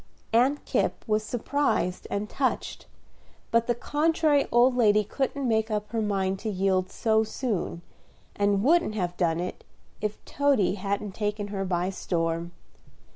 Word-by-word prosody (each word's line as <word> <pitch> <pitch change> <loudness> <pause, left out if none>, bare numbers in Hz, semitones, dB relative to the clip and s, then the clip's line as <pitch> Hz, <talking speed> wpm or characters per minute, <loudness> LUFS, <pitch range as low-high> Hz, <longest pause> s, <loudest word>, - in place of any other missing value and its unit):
Aunt 260 +5 +3
Kipp - - -1
was 215 0 +2
surprised 235 -4 -1
and 205 +1 -2
touched; 260 +4 -2 0.6
but 230 0 +3
the 240 - +2
contrary 300 +2 +2
old 245 +2 +5
lady 210 -3 +4
couldn't 270 +5 -2
make 220 -1 +1
up 210 -1 -2
her 225 -1 0
mind 195 -2 0
to 220 - -3
yield 190 -1 +1
so 220 +2 +2
soon, 215 -7 -3 0.5
and 200 0 +2
wouldn't 325 -5 +3
have 180 -4 -2
done 170 -2 +1
it 180 +1 -5 0.4
if 210 0 -2
Toady 275 -10 +2
hadn't 200 +1 -3
taken 210 0 -2
her 195 -1 -3
by 180 0 0
storm. 170 -2 -2
210 Hz, 145 wpm, -27 LUFS, 190-245 Hz, 0.6 s, old